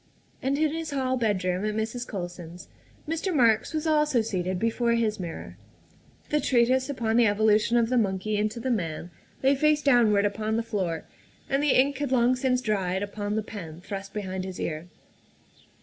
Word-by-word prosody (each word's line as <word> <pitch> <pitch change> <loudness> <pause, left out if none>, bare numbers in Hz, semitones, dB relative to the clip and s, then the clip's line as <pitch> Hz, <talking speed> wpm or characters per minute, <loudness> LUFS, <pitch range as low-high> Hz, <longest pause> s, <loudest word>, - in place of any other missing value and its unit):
And 270 +2 0
in 310 0 +2
his 325 -1 -4
hall 260 -2 0
bedroom 190 -6 0
at 215 0 -1
Mrs. 220 +3 -3
Colson's 175 -2 -7 0.4
Mr. 330 +4 -2
Marks 230 -8 +3
was 310 0 -2
also 300 -5 +3
seated 185 -4 -2
before 230 +3 +1
his 225 -3 0
mirror. 170 -3 -7 0.7
The 300 - +3
treatise 255 +1 +2
upon 230 -5 0
the 240 -2 +5
evolution 215 +2 +3
of 230 -1 +2
the 250 -1 +3
monkey 200 0 -1
into 215 +2 -1
the 260 +2 -2
man 175 -5 -3 0.3
lay 270 +1 +5
face 300 +1 +2
down 245 -5 +5
ward 200 0 +3
upon 215 +2 -1
the 230 - 0
floor, 185 -7 -3 0.4
and 275 +1 +1
the 290 -3 +4
ink 275 +1 +2
had 285 -3 -2
long 250 0 +3
since 250 0 +1
dried 190 -4 -1
upon 205 0 -3
the 220 - -1
pen 170 -7 -8
thrust 195 +1 -7
behind 190 -3 -4
his 185 -1 -7
ear. 155 +1 -4
220 Hz, 180 wpm, -26 LUFS, 195-260 Hz, 0.7 s, the